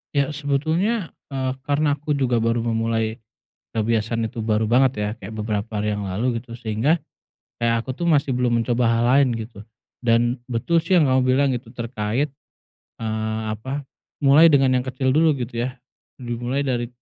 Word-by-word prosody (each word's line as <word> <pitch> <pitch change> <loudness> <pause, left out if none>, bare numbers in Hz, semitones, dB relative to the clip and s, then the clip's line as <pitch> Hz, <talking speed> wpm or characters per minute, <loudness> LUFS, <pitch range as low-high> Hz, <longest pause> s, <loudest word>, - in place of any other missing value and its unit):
Ya, 140 +1 +2
sebetulnya, 160 +8 0 0.2
eee, 130 -2 -2 0.2
karena 145 0 +2
aku 150 0 -1
juga 125 -4 +1
baru 115 +1 +1
memulai 115 -1 -1 0.5
kebiasaan 115 0 0
itu 115 -2 -6
baru 110 0 +1
banget, 130 +2 +4
ya, 105 - 0
kayak 100 0 -9
beberapa 105 -1 -3
hari 105 0 0
yang 105 - -4
lalu, 115 +5 -1
gitu, 125 - -13
sehingga 115 +8 +1 0.6
kayak 115 0 +1
aku 130 - -3
tuh 170 +4 -2
masih 140 -4 +2
belum 120 -2 +2
mencoba 120 0 +1
hal 115 0 +2
lain, 140 -3 +4
gitu, 110 -2 -8 0.4
dan 120 +1 +2
betul 165 +8 +1
sih 180 +2 +3
yang 150 - +4
kamu 130 0 +3
bilang, 130 +2 +3
gitu, 115 -1 -8
terkait, 120 +2 -2 0.7
eee, 110 0 -2
apa, 130 +7 -4 0.4
mulai 145 +4 +7
dengan 135 -4 +4
yang 125 - -5
kecil 130 0 0
dulu, 155 0 +4
gitu 120 0 -2
ya, 130 - -8 0.5
dimulai 120 +3 -2
dari 120 -3 -1
120 Hz, 170 wpm, -22 LUFS, 115-140 Hz, 0.7 s, mulai